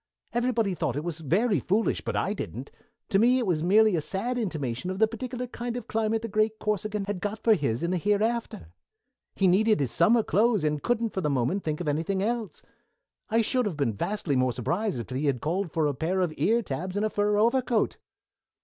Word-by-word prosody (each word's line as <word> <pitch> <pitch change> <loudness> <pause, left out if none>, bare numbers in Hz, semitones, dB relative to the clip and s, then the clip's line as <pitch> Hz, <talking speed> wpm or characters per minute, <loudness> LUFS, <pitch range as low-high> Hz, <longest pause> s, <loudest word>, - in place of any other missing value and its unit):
Everybody 235 -4 +1
thought 160 -6 -2
it 145 - -3
was 170 -2 -4
very 190 - +1
foolish, 205 - 0
but - - -4
I - - 0
didn't. - - -6 0.4
To 195 -3 +3
me 245 +4 +5
it 250 - 0
was 170 -5 0
merely 210 +3 +4
a 160 - 0
sad 205 +10 -2
intimation 155 - -3
of 185 - -3
the 220 +2 +4
particular 250 +2 -5
kind 240 0 -5
of 245 - -7
climate 225 0 0
the - - -2
great 215 +1 +1
Corsican 210 -1 -2
had 200 -3 -4
got 205 +2 -2
for 225 - +6
his 135 - -1
in 170 - 0
the 185 - +1
hereafter. 210 - -1 0.7
He 195 - +1
needed 210 +2 +4
his 135 -5 -1
summer 220 +7 +4
clothes, 215 -2 +2
and 150 -1 0
couldn't 235 -2 0
for 190 - -2
the 150 - 0
moment 140 +9 0
think 155 +1 -2
of 170 - -4
anything 165 +6 0
else. 230 -1 -3 0.7
I 225 0 +3
should 250 0 +1
have 170 -7 -4
been 140 -6 0
vastly 175 - -2
more 130 -1 +2
surprised 175 - -1
if 115 - -7
he 135 +4 -1
had 135 -3 +1
called 170 - -2
for 160 0 +1
a 145 - +1
pair 170 +7 -1
of 175 -4 0
ear 230 +3 +2
tabs 180 +5 -4
and 210 - +1
a - - +1
fur 205 0 +1
overcoat." 235 +1 +2
200 Hz, 220 wpm, -27 LUFS, 155-225 Hz, 0.7 s, for